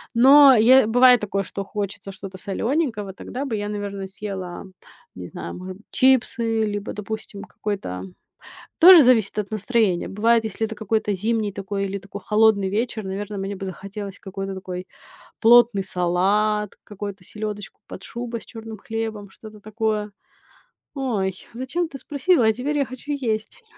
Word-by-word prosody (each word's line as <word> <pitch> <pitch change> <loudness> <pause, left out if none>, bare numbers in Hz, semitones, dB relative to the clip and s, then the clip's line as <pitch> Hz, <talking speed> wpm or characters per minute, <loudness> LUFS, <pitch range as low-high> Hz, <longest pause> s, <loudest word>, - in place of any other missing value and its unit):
Но 270 +3 +8
я, 245 +2 +6
бывает 245 +1 +6
такое, 200 -1 -1
что 200 +1 -6
хочется 200 0 -5
что-то 195 0 -9
солёненького, 225 - -2
тогда 255 +7 -6
бы 245 -5 -2
я, 205 0 -3
наверно, 200 -2 -5
съела, 190 -2 -6 0.5
не 90 -1 -7
знаю, - - -7
може 185 +1 -7
б - - -18
чипсы, 235 -3 +2
либо, 205 -1 -4
допустим, 210 -1 -6
какой-то. 195 - -5 0.8
Тоже 350 -2 +10
зависит 225 -5 +3
от 205 0 -4
настроения. 215 -4 0
Бывает, 225 +3 +2
если 220 0 -2
это 220 - -7
какой-то 215 0 -1
зимний 215 +1 -1
такой 200 0 -3
или 195 0 -3
такой 195 +1 -9
холодный 210 -2 +3
вечер, 220 +2 -2
наверно, 200 +2 -5
мне 195 +1 -4
бы 195 0 -6
захотелось 200 +1 -7
какой-то 195 0 -6
такой 185 -1 -6 0.6
плотный 235 -3 +6
салат, 195 +4 +1
какой-то 200 -2 -7
"Селёдочку 210 0 -7
под - - -9
шубой" 235 -1 -5
с - - -15
чёрным 225 -2 -9
хлебом, 220 -1 -5
что-то 215 +1 -13
такое. 215 0 -2 0.8
Ой, 220 -9 -1 0.2
зачем 260 +9 -2
ты 275 - -8
спросила? 295 -1 +2
А 220 - +4
теперь 275 +6 -2
я 280 - +2
хочу 255 +3 -8
есть. 255 - -3
210 Hz, 155 wpm, -23 LUFS, 195-235 Hz, 0.8 s, Тоже